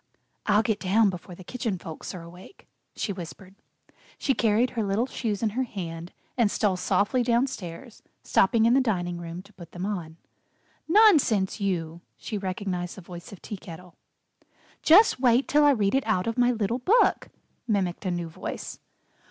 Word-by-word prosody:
"I'll 210 +1 +4
get 215 -1 0
down 205 +2 +3
before 180 0 -9
the 185 - -12
Kitchen 225 -1 -3
Folks 165 +2 -8
are 175 - -8
awake," 175 - -14 0.3
she 200 - -2
whispered. 185 +1 -9 0.6
She 275 - +1
carried 230 +1 +2
her 235 - -2
little 205 +4 0
shoes 225 -5 -3
in 215 - +1
her 250 +5 -1
hand 175 -8 -5 0.2
and 235 -5 +3
stole 205 -2 +1
softly 205 +6 +1
downstairs, 235 -3 -2 0.2
stopping 220 +3 +3
in 235 - +5
the 270 - +5
dining 175 -7 -1
room 170 +1 -7
to 200 +2 -20
put 170 -4 -13
them 180 +2 -4
on. 170 -6 -4 0.7
"Nonsense, 305 - +4
you!" 170 -4 -2 0.2
she 220 - -6
recognized 185 -2 -4
the - - -8
voice 175 0 -10
of 200 - -12
Tea 210 - -6
Kettle. 180 -1 -11 0.9
"Just 365 - +6
wait 250 0 +3
till 300 +1 +4
I - - +7
read 210 -8 +2
it 270 -4 +1
out 185 -4 +1
of 230 - -2
my 245 -1 +3
little 230 0 -1
book," 420 - +3 0.4
mimicked 195 -5 -1
a 190 - -1
new 175 -1 -2
voice. 160 - -7
200 Hz, 175 wpm, -26 LUFS, 180-235 Hz, 0.9 s, I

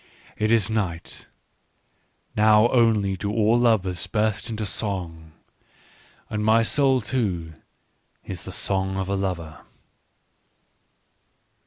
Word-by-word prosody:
" - - -26
It - - +1
is 110 -4 +3
night: 100 -7 -4 1.1
now 110 +2 +5
only 110 -5 +2
do 100 +2 -3
all 110 +2 +3
lovers 95 -8 +1
burst 110 +1 -1
into 110 -1 -3
song. 90 -7 -4 1.0
And 105 -1 -3
my 110 +1 +4
soul 135 +1 +2
too 95 -9 -2 0.7
is - - -6
the - - -8
song 95 -1 -1
of 95 -1 -2
a 100 - -1
lover." 85 -6 -4
105 Hz, 115 wpm, -24 LUFS, 95-110 Hz, 1.1 s, now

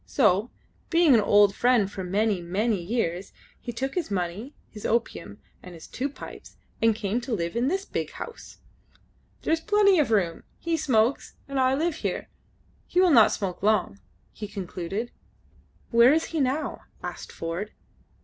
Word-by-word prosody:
So, 185 - +2 0.4
being 335 -4 +5
an 230 - +6
old 205 -1 +5
friend 235 -4 +2
for 190 - -5
many, 200 +1 0
many 200 +4 0
years, 185 -2 -2 0.3
he 240 - -6
took 265 +4 -3
his 355 -8 -2
money, 195 - -3
his 210 - -11
opium, 220 - -2 0.2
and 180 -2 -11
two 255 - -4
pipes, 285 - -11 0.2
and 225 -1 +4
came 220 +2 -2
to 235 -1 -2
live 170 -1 -3
in 240 +2 +1
this 385 +6 -1
big - - -3
house. 470 - -9 0.9
"There - - +1
is 325 - 0
plenty 405 -2 +4
of 290 - +2
room. 185 -7 +1 0.2
He 335 -1 -1
smokes, 255 -4 +1
and 275 -1 -2
I 260 0 +3
live 325 +2 -1
here. - - -3 0.6
He 360 - +1
will 365 -2 +5
not 230 -6 +7
smoke 190 -3 -3
long," 205 - +1 0.3
he 210 - -6
concluded. 195 +3 -5 0.8
"Where 235 +2 +7
is 320 +2 +3
he 320 - 0
now?" 275 +3 -1 0.2
asked - - -7
Ford. 170 +6 -5
225 Hz, 165 wpm, -26 LUFS, 195-275 Hz, 0.9 s, not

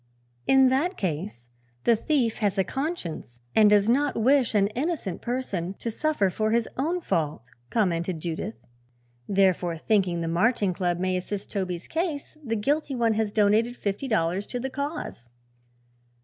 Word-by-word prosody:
"In 265 -1 +6
that 315 +9 +1
case, 155 - -4 0.3
the 235 - +5
thief 240 -1 0
has 205 -2 +1
a 190 - +4
conscience 185 - -4 0.2
and 215 -1 +7
does 205 0 +4
not 275 +2 +2
wish 255 0 +3
an 200 -1 +5
innocent 255 - -3
person 200 -8 -3
to 230 - -4
suffer 220 -8 +1
for 215 +3 0
his 230 +1 +2
own 335 +7 -1
fault," 150 - -2 0.2
commented 175 -5 0
Judith. 175 +6 -4 0.7
"Therefore, 185 -3 +2
thinking 185 -2 +1
the 165 - -2
Marching 195 +3 +2
Club 175 -1 0
may 185 +1 0
assist 195 +2 -5
Toby's 180 -4 -3
case, 320 -4 -3
the 225 -4 -1
guilty 280 +6 0
one 230 -2 +2
has 215 -1 0
donated 220 +3 +2
fifty 205 +7 -2
dollars 195 -3 0
to 245 - -4
the 265 +2 -4
cause." 280 - -5
210 Hz, 155 wpm, -26 LUFS, 180-260 Hz, 0.7 s, and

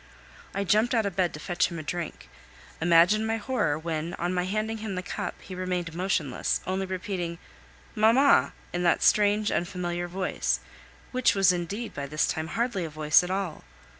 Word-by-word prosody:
I 200 - 0
jumped 215 +5 +3
out 225 -2 +2
of 195 -3 -3
bed 180 -3 +2
to - - -8
fetch 175 +2 +1
him 170 - -7
a 155 - -5
drink. 170 +2 -5 0.5
Imagine 175 +6 +5
my 225 0 0
horror 205 - 0
when, 165 +1 -3
on 175 +2 -2
my 180 0 0
handing 215 +3 -2
him 215 -3 -4
the 185 - -3
cup, - - -5
he 190 - -9
remained 180 -2 -3
motionless, 170 -6 0
only 190 +1 -2
repeating 180 -2 -3 0.6
"Mamma!" 235 +6 +4 0.2
in 175 - -1
that 175 -1 +2
strange, 210 0 +4
unfamiliar 175 0 -2
voice, 185 +1 -1 0.5
which 255 -3 +3
was 195 -1 +5
indeed 195 +6 -4
by 140 -1 -5
this 150 +2 +1
time 160 0 -2
hardly 230 -1 -1
a 165 - -4
voice 150 0 +4
at 180 - -5
all. 190 -4 -3
185 Hz, 180 wpm, -27 LUFS, 170-210 Hz, 0.6 s, Imagine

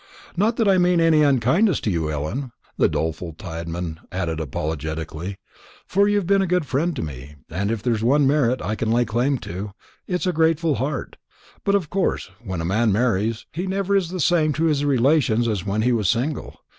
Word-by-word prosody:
"Not 215 +6 +2
that 225 -3 +1
I 190 -2 +5
mean 180 -1 +3
any 165 -2 +4
unkindness 145 - +3
to 105 - 0
you, 80 -3 -1
Ellen," 80 - -3 0.2
the - - +3
doleful 80 +1 -3
Tadman 85 0 -5
added 85 -4 -2
apologetically, 80 +4 -4 0.5
"for 200 +2 +2
you've 205 -2 +1
been 195 +2 +3
a 190 - 0
good 180 -2 +1
friend 150 +5 0
to 120 - -3
me, 70 0 -8 0.2
and 100 +5 -1
if 115 -2 -2
there's 115 -3 0
one 140 +4 +4
merit 135 -3 +2
I 100 +4 -1
can 110 0 -2
lay 120 +2 +3
claim 120 +6 +1
to, 95 +3 -6 0.3
it's 180 +1 -1
a 180 - +1
grateful 160 0 +2
heart; 135 0 -3 0.5
but 200 - +2
of 180 -7 -1
course, 185 - -1
when 95 -6 -4
a - - -3
man 110 +5 +2
marries, 110 0 0
he 175 +5 -4
never 195 +1 0
is 190 -4 +1
the 185 +1 -5
same 155 -1 +3
to 155 +3 -1
his 150 -3 +2
relations 130 -4 +3
as 105 -4 -2
when 105 +2 0
he 125 - +3
was 110 -6 +1
single. 135 +6 -2
125 Hz, 200 wpm, -22 LUFS, -, 0.5 s, I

